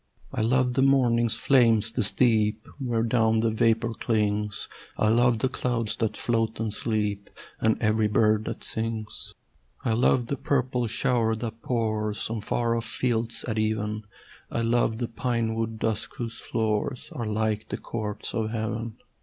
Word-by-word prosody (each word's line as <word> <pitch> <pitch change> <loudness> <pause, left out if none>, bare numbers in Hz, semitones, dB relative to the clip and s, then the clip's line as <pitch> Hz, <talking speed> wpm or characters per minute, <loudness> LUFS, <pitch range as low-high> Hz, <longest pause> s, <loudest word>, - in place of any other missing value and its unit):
I - - -1
love 125 +2 +2
the 135 - +2
morning's 120 -4 +3
flame, 120 -4 +4
the 125 - 0
steep 110 -1 +2
Where 120 -4 0
down 110 -1 +2
the 115 0 +2
vapour 115 +1 +2
clings: 105 -3 -1 0.3
I 110 - +3
love 120 +1 +4
the 120 - +1
clouds 115 -4 -1
that 110 -2 -1
float 115 -2 0
and 110 -2 -1
sleep, 105 -2 -2 0.3
And 110 0 +2
every 110 -1 +2
bird 110 0 +3
that - - -5
sings. 110 -1 -4 0.5
I 115 - +2
love 120 +1 +3
the 140 +4 -3
purple 125 -3 0
shower 115 -1 +2
that 115 0 -6
pours 110 -3 -1
On 115 -2 -2
far 115 +2 0
off 115 0 -2
fields 115 0 -1
at 110 -2 -1
even: 110 0 -1 0.4
I 115 - -1
love 115 -1 +2
the 120 0 -2
pine 115 -1 -1
wood 115 0 -2
dusk 110 -1 -2
whose 115 -2 -5
floors 110 +3 -2
Are 120 -3 -4
like 110 0 -1
the - - -3
courts 105 -2 -5
of 110 -2 -1
heaven. 110 0 -3
115 Hz, 160 wpm, -26 LUFS, 110-120 Hz, 0.5 s, flame